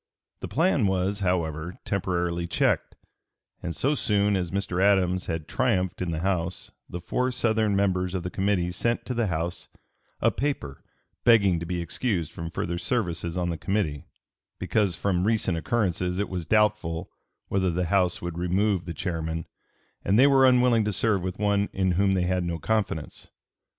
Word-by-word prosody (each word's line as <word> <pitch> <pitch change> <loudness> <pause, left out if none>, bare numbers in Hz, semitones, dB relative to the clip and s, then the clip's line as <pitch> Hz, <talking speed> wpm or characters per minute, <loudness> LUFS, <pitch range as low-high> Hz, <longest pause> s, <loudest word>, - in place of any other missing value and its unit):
The - - -5
plan 150 - +2
was, 95 +2 0
however, 90 -3 -1
temporarily 85 -3 -1
checked, 85 - 0 0.7
and 85 -1 -4
so 140 +3 +1
soon 105 -6 +1
as 90 -2 -1
Mr. 95 -1 -2
Adams 95 -2 +2
had 80 -2 -3
triumphed 95 -9 0
in 90 - -1
the 80 -1 -2
House 90 -2 -2 0.2
the 90 - -5
four 125 +9 -1
Southern 110 -4 +1
members 95 -2 +1
of 90 - -2
the 90 - -4
committee 95 -3 0
sent 115 +6 -1
to 125 - -3
the 120 -2 0
House 85 0 -3 0.5
a - - +3
paper 130 - -3 0.4
begging 100 -7 +5
to 85 - -6
be 90 -1 -2
excused 85 - -2
from 85 0 -6
further 85 0 -3
services 85 -5 -2
on 90 -1 0
the 80 - -5
committee, 75 -2 -1 0.5
"because 100 -6 0
from 90 0 0
recent 110 -6 +1
occurrences 90 -1 -1
it 100 - -1
was 90 -3 -4
doubtful 105 -5 +1 0.4
whether 95 -1 +1
the 90 +1 0
House 90 0 +1
would 85 -1 -4
remove 95 +1 +1
the 85 -1 -6
chairman, 80 -3 -3 0.6
and 100 - +2
they 130 - +7
were 135 -2 +6
unwilling 125 -3 +4
to 105 - 0
serve 105 0 +1
with 90 +1 -4
one 100 -1 +1
in 95 -1 +1
whom 95 +2 +2
they 90 - +1
had 90 0 0
no 85 -1 -2
confidence." 100 -4 -2
95 Hz, 170 wpm, -26 LUFS, 85-105 Hz, 0.7 s, they